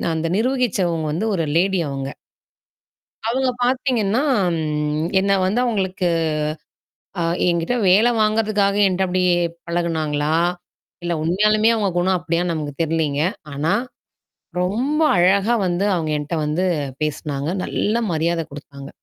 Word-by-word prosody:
அந்த 160 Hz, +1 st, -1 dB
நிர்வகிச்சவங்க 215 Hz, -10 st, 0 dB
வந்து 180 Hz, +8 st, -1 dB
ஒரு 165 Hz, -3 st, 0 dB
லேடி 190 Hz, 0 st, +2 dB
அவங்க. 135 Hz, 0 st, -4 dB, 1.2 s
அவங்க 260 Hz, +2 st, +1 dB
பார்த்தீங்கன்னா, 250 Hz, -3 st, +1 dB, 1.0 s
என்ன 200 Hz, +1 st, +1 dB
வந்து 200 Hz, +6 st, +1 dB
அவங்களுக்கு 190 Hz, -5 st, -1 dB, 1.2 s
அ -, -, +1 dB, 0.3 s
என்கிட்ட 170 Hz, +5 st, 0 dB
வேல 210 Hz, +6 st, +5 dB
வாங்குறதுக்காக 215 Hz, -2 st, +2 dB
என்ட்ட 190 Hz, 0 st, +1 dB
அப்டி 185 Hz, 0 st, 0 dB, 0.4 s
பழகுனாங்களா? 160 Hz, -3 st, -1 dB, 0.7 s
இல்ல 175 Hz, 0 st, -2 dB
உண்மையாலுமே 215 Hz, +6 st, +3 dB
அவங்க 210 Hz, -3 st, 0 dB
குணம் 185 Hz, +1 st, +2 dB
அப்டியா 170 Hz, 0 st, -1 dB
நமக்கு 150 Hz, -3 st, -4 dB
தெர்லைங்க. 155 Hz, -3 st, 0 dB, 0.3 s
ஆனா. 155 Hz, +6 st, +1 dB, 0.9 s
ரொம்ப 250 Hz, -, 0 dB, 0.2 s
அழகா 195 Hz, +5 st, +3 dB
வந்து 180 Hz, +3 st, 0 dB
அவங்க 165 Hz, -3 st, -1 dB
என்ட்ட 150 Hz, +3 st, -5 dB
வந்து 155 Hz, +5 st, 0 dB, 0.4 s
பேசனாங்க. 150 Hz, -1 st, -2 dB, 0.2 s
நல்ல 210 Hz, -, -1 dB, 0.2 s
மரியாதை 165 Hz, +1 st, 0 dB
குடுத்தாங்க. 140 Hz, -1 st, -10 dB
180 Hz, 115 wpm, -21 LUFS, 160-210 Hz, 1.2 s, வேல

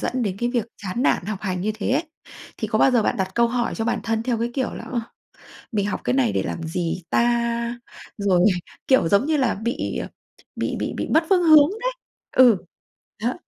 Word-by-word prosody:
dẫn 255 Hz, 0 st, -1 dB
đến 195 Hz, -4 st, -2 dB
cái 240 Hz, -, 0 dB
việc 235 Hz, -3 st, -1 dB, 0.2 s
chán 200 Hz, +6 st, -2 dB
nản -, -, +2 dB
học 210 Hz, -2 st, -3 dB
hành 185 Hz, -3 st, -2 dB
như 215 Hz, +3 st, -1 dB
thế 220 Hz, +2 st, -3 dB
ấy, 300 Hz, +6 st, +1 dB, 0.5 s
thì -, -, -3 dB
có -, -, 0 dB
bao 270 Hz, -, +5 dB
giờ 240 Hz, -3 st, +3 dB
bạn -, -, 0 dB
đặt 190 Hz, -1 st, -1 dB
câu 235 Hz, 0 st, +3 dB
hỏi 240 Hz, 0 st, -1 dB
cho 225 Hz, -, -2 dB
bản 235 Hz, -, 0 dB
thân, 225 Hz, -1 st, -1 dB
theo 235 Hz, -1 st, -1 dB
cái 235 Hz, +1 st, -1 dB
kiểu 260 Hz, -3 st, -1 dB
là, -, -, -7 dB
ờ, 240 Hz, -, 0 dB, 0.7 s
"mình 205 Hz, -2 st, 0 dB
học 205 Hz, -, -3 dB
cái -, -, 0 dB
này 250 Hz, -5 st, +2 dB
để -, -, 0 dB
làm 165 Hz, -, -4 dB
gì 170 Hz, +1 st, -3 dB
ta?" 235 Hz, 0 st, 0 dB, 0.4 s
Rồi, 190 Hz, -2 st, +3 dB, 0.4 s
kiểu 260 Hz, -11 st, +4 dB
giống 200 Hz, +8 st, +3 dB
như 310 Hz, 0 st, +1 dB
là, 260 Hz, -4 st, +1 dB
bị, 235 Hz, +6 st, -3 dB
ờ, -, -, -5 dB, 0.5 s
bị -, -, -2 dB
bị -, -, -2 dB
bị -, -, -2 dB
mất 320 Hz, +1 st, +5 dB
phương 365 Hz, -2 st, +4 dB
hướng 310 Hz, -2 st, +7 dB
đấy. -, -, 0 dB, 0.4 s
Ừ, 245 Hz, -6 st, +6 dB, 0.7 s
đó. 245 Hz, -, +1 dB
235 Hz, 225 wpm, -23 LUFS, 205-255 Hz, 0.7 s, hướng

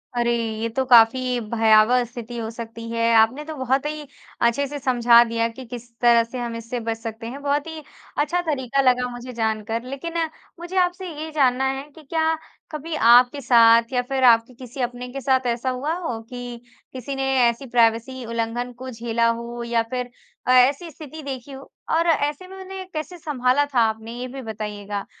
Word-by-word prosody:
अरे! 240 Hz, 0 st, +1 dB, 0.3 s
ये 230 Hz, -, 0 dB
तो 260 Hz, +4 st, -1 dB
काफ़ी 245 Hz, +1 st, +5 dB
भयावह 225 Hz, +2 st, +5 dB
स्थिति 240 Hz, 0 st, -8 dB
हो 225 Hz, -1 st, -4 dB
सकती 230 Hz, 0 st, -8 dB
है। 230 Hz, 0 st, 0 dB
आपने 235 Hz, +7 st, +3 dB
तो 315 Hz, -1 st, -6 dB
बहुत 265 Hz, +2 st, 0 dB
ही 300 Hz, 0 st, -4 dB, 0.4 s
अच्छे 235 Hz, +4 st, +2 dB
से 290 Hz, +1 st, -6 dB
समझा 240 Hz, -3 st, +5 dB
दिया 230 Hz, 0 st, -1 dB
कि, 255 Hz, +2 st, -10 dB
किस 240 Hz, 0 st, -9 dB
तरह 235 Hz, -1 st, +5 dB
से 245 Hz, +2 st, -7 dB
हम 235 Hz, -1 st, -4 dB
इससे 230 Hz, +1 st, -5 dB
बच 225 Hz, 0 st, -3 dB
सकते 225 Hz, 0 st, -7 dB
हैं। 275 Hz, +4 st, -7 dB
बहुत 285 Hz, +2 st, 0 dB
ही 320 Hz, -2 st, -7 dB, 0.3 s
अच्छा 335 Hz, +5 st, +1 dB
तरीका 275 Hz, -5 st, 0 dB
लगा 250 Hz, -1 st, +3 dB
मुझे 245 Hz, +1 st, -8 dB
जानकर 225 Hz, 0 st, -2 dB
लेकिन 275 Hz, +6 st, -6 dB, 0.5 s
मुझे 350 Hz, +2 st, -5 dB
आपसे 360 Hz, +1 st, -1 dB
ये 315 Hz, 0 st, -5 dB
जानना 265 Hz, -2 st, +3 dB
है 270 Hz, +1 st, -3 dB
कि 315 Hz, -, -14 dB
क्या 320 Hz, +2 st, 0 dB, 0.4 s
कभी 310 Hz, +1 st, -5 dB
आपके 245 Hz, +2 st, +5 dB
साथ 230 Hz, -1 st, +5 dB
या 250 Hz, -, +2 dB
फ़िर 265 Hz, +1 st, -2 dB
आपके 235 Hz, 0 st, +5 dB
किसी 255 Hz, +1 st, -8 dB
अपने 245 Hz, 0 st, -3 dB
के 275 Hz, -, -5 dB
साथ 260 Hz, 0 st, +2 dB
ऐसा 240 Hz, +2 st, -1 dB
हुआ 270 Hz, +6 st, -2 dB
हो 245 Hz, -10 st, -4 dB
कि 245 Hz, -2 st, -7 dB, 0.3 s
किसी 260 Hz, +2 st, -5 dB
ने 270 Hz, -, -2 dB, 0.3 s
ऐसी 235 Hz, +4 st, -5 dB
प्राइवेसी 235 Hz, +1 st, +1 dB
उल्लंघन 230 Hz, +2 st, -3 dB
को 260 Hz, +1 st, -7 dB
झेला 230 Hz, 0 st, 0 dB
हो 235 Hz, +1 st, -4 dB
या 235 Hz, -1 st, +1 dB
फ़िर 250 Hz, -1 st, -3 dB, 0.4 s
अ, 255 Hz, -, +4 dB
ऐसी 270 Hz, +7 st, +4 dB
स्थिति 310 Hz, +1 st, -10 dB
देखी 270 Hz, -1 st, -6 dB
हो? 270 Hz, 0 st, -11 dB, 0.2 s
और 335 Hz, +1 st, +2 dB
ऐसे 300 Hz, +2 st, 0 dB
में 380 Hz, -, -11 dB
उन्हें 380 Hz, 0 st, -7 dB
कैसे 310 Hz, +3 st, -5 dB
संभाला 285 Hz, -3 st, +1 dB
था 250 Hz, -, +3 dB
आपने? 220 Hz, +1 st, -1 dB
ये 255 Hz, -, -4 dB
भी 265 Hz, +1 st, -8 dB
बताइएगा। 210 Hz, -3 st, -5 dB
250 Hz, 195 wpm, -23 LUFS, 230-275 Hz, 0.5 s, काफ़ी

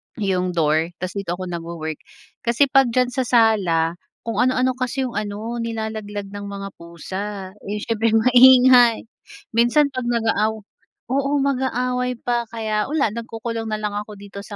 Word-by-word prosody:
yung 185 Hz, -4 st, -1 dB
door 160 Hz, 0 st, +2 dB, 0.2 s
ta's 185 Hz, -, -2 dB
dito 175 Hz, -3 st, -3 dB
ako 185 Hz, -1 st, -6 dB
nagwo-work. 165 Hz, -2 st, -5 dB, 0.4 s
Kasi 240 Hz, +4 st, +2 dB
'pag 270 Hz, -2 st, +5 dB
diyan 250 Hz, -1 st, +2 dB
sa 255 Hz, -1 st, -2 dB
sala, 185 Hz, -8 st, +2 dB, 0.2 s
kung 230 Hz, -3 st, -4 dB
ano-ano 255 Hz, 0 st, +2 dB
kasi 255 Hz, +1 st, -2 dB
yung 240 Hz, -4 st, -4 dB
ano, 215 Hz, +3 st, -5 dB
nilalaglag 220 Hz, -3 st, -4 dB
ng 205 Hz, 0 st, -7 dB
mga 200 Hz, 0 st, -6 dB
pusa. 170 Hz, +4 st, -6 dB, 0.4 s
Eh, 210 Hz, 0 st, -3 dB
siyempre 225 Hz, 0 st, 0 dB
maingay. 250 Hz, 0 st, +6 dB, 0.5 s
Minsan 240 Hz, +6 st, +3 dB
'pag 255 Hz, -2 st, -4 dB
nag-aaw 225 Hz, -2 st, +1 dB, 0.6 s
oo, 275 Hz, +1 st, 0 dB
mag-aaway 250 Hz, -2 st, -1 dB
pa. 240 Hz, -1 st, -1 dB
Kaya 220 Hz, -2 st, -2 dB
wala, 285 Hz, -6 st, +1 dB
nagkukulong 230 Hz, 0 st, -5 dB
na 215 Hz, -, -1 dB
lang 210 Hz, -1 st, -2 dB
ako 210 Hz, 0 st, -6 dB
dito 200 Hz, 0 st, -10 dB
sa 205 Hz, +1 st, -9 dB
225 Hz, 155 wpm, -21 LUFS, 200-250 Hz, 0.6 s, maingay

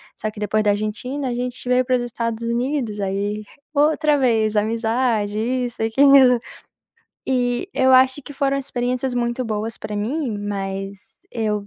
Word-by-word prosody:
Só 215 Hz, -, -3 dB
que 210 Hz, -, -11 dB
depois 215 Hz, +1 st, 0 dB
da 205 Hz, -, +2 dB
Argentina 250 Hz, +7 st, -3 dB
a -, -, -2 dB
gente 245 Hz, 0 st, -4 dB
veio 250 Hz, 0 st, +3 dB
pros 255 Hz, -1 st, +1 dB
Estados 230 Hz, -1 st, -3 dB
Unidos, 240 Hz, -3 st, -1 dB
aí 200 Hz, +2 st, -2 dB, 0.3 s
outra 300 Hz, 0 st, +3 dB
vez 220 Hz, -4 st, +2 dB
amizade, 220 Hz, -1 st, 0 dB
isso, 245 Hz, 0 st, -2 dB
aquilo. 260 Hz, +2 st, +6 dB, 0.9 s
E 245 Hz, +4 st, 0 dB
eu 260 Hz, 0 st, +3 dB
acho 260 Hz, +2 st, +4 dB
que 290 Hz, -, -10 dB
foram 275 Hz, 0 st, +1 dB
experiências 250 Hz, -1 st, -2 dB
muito 240 Hz, +1 st, -1 dB
boas 220 Hz, +1 st, -3 dB
pra 210 Hz, -, -5 dB
mim, 235 Hz, +1 st, -2 dB
mas 195 Hz, -1 st, -4 dB, 0.3 s
eu 210 Hz, -3 st, -2 dB
240 Hz, 150 wpm, -21 LUFS, 215-255 Hz, 0.9 s, aquilo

